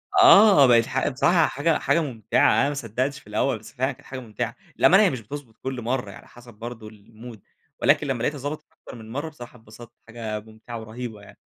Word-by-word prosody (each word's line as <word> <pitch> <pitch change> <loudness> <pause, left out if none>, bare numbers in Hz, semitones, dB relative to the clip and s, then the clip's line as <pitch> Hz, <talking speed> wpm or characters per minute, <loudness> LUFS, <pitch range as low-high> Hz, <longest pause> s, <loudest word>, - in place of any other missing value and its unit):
آه 215 - +7
بقت 115 -2 +5
ح 130 +1 -1
بصراحة 150 +5 +3
حاجة 155 +3 0
حاجة 170 - +2
ممتعة، 115 -8 +1
أنا 140 - +2
ما - - -3
صدقتش 130 +2 -3
في - - -22
الأول، 110 +4 0
بس 110 - -14
فعلًا 130 +2 -1
كانت 140 +2 -15
حاجة 130 -1 -7
ممتعة. 120 0 -5 0.2
للأمانة 195 +4 +6
هي 195 - +4
مش 130 -4 -5
بتضبط 120 -1 -10
كل 130 -2 -4
مرّة 120 -3 -3
هي - - -12
على - - -15
حسب 120 0 -15
برضو 115 0 -9
المود، 110 +1 -13 0.4
ولكن 150 - +3
لما 135 - -1
لاقيتها 150 +2 -1
ضبطت 145 +3 -6
أكتر - - -13
من 110 -1 -11
مرّة 145 +5 -4
بصراحة 125 -5 -12
اتبسطت، 110 +1 -14 0.2
حاجة 110 -2 -5
ممتعة 110 +2 -10
ورهيبة 110 -1 -8
يعني. - - -16
120 Hz, 215 wpm, -24 LUFS, 110-140 Hz, 0.4 s, آه